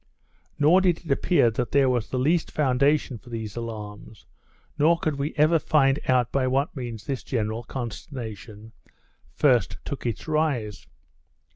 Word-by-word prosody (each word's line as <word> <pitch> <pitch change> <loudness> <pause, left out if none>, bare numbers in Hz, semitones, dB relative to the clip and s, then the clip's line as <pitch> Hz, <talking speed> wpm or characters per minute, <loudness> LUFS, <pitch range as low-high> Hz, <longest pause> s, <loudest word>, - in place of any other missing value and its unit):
Nor 155 +6 +5
did 175 -2 +1
it 150 - -4
appear 140 -4 +3
that 120 +2 -3
there 140 -1 +4
was 125 -4 0
the 130 - -2
least 155 +6 +1
foundation 140 -2 +1
for 120 - -16
these 110 -3 -5
alarms, 110 -2 -8 0.5
nor 165 +3 +4
could 155 -4 -2
we 145 +3 -3
ever 155 +2 +4
find 140 -3 +2
out 125 -2 +2
by 135 -2 +1
what 135 +4 0
means 120 -5 -6
this 135 -2 -3
general 110 -2 -2
consternation 115 - -7 0.6
first 120 -9 +2
took 140 -3 -4
its 115 +7 -4
rise. 145 -10 -1
130 Hz, 150 wpm, -25 LUFS, 115-150 Hz, 0.6 s, Nor